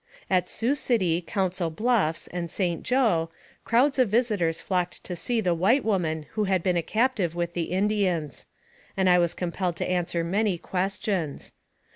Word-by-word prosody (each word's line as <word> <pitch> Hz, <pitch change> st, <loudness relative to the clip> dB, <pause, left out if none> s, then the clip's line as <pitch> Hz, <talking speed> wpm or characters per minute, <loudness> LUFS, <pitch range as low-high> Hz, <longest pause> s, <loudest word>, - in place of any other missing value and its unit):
At 180 Hz, -1 st, +2 dB
Sioux 240 Hz, +5 st, 0 dB
City, 190 Hz, -, +1 dB
Council 185 Hz, -1 st, -1 dB
Bluffs, 205 Hz, -3 st, +1 dB
and 175 Hz, -1 st, -3 dB
St. 175 Hz, -2 st, -1 dB
Joe, 220 Hz, -11 st, +2 dB, 0.3 s
crowds 265 Hz, +4 st, +2 dB
of 250 Hz, -4 st, +4 dB
visitors 205 Hz, -8 st, +1 dB
flocked 180 Hz, -2 st, -2 dB
to 180 Hz, -, -5 dB
see 230 Hz, +6 st, -1 dB
the 180 Hz, -4 st, +1 dB
white 200 Hz, -, +2 dB
woman 165 Hz, -7 st, 0 dB
who 215 Hz, -, 0 dB
had 190 Hz, -3 st, +1 dB
been 180 Hz, -1 st, +1 dB
a 170 Hz, -, +2 dB
captive 215 Hz, -3 st, 0 dB
with 170 Hz, 0 st, -2 dB
the 170 Hz, -1 st, -1 dB
Indians; 185 Hz, -, 0 dB, 0.5 s
and 190 Hz, -1 st, +2 dB
I 180 Hz, -1 st, +6 dB
was 170 Hz, -1 st, +1 dB
compelled 180 Hz, 0 st, -2 dB
to -, -, -3 dB
answer 175 Hz, -2 st, -1 dB
many 195 Hz, +2 st, 0 dB
questions. 185 Hz, -3 st, -3 dB
185 Hz, 165 wpm, -26 LUFS, 170-215 Hz, 0.5 s, I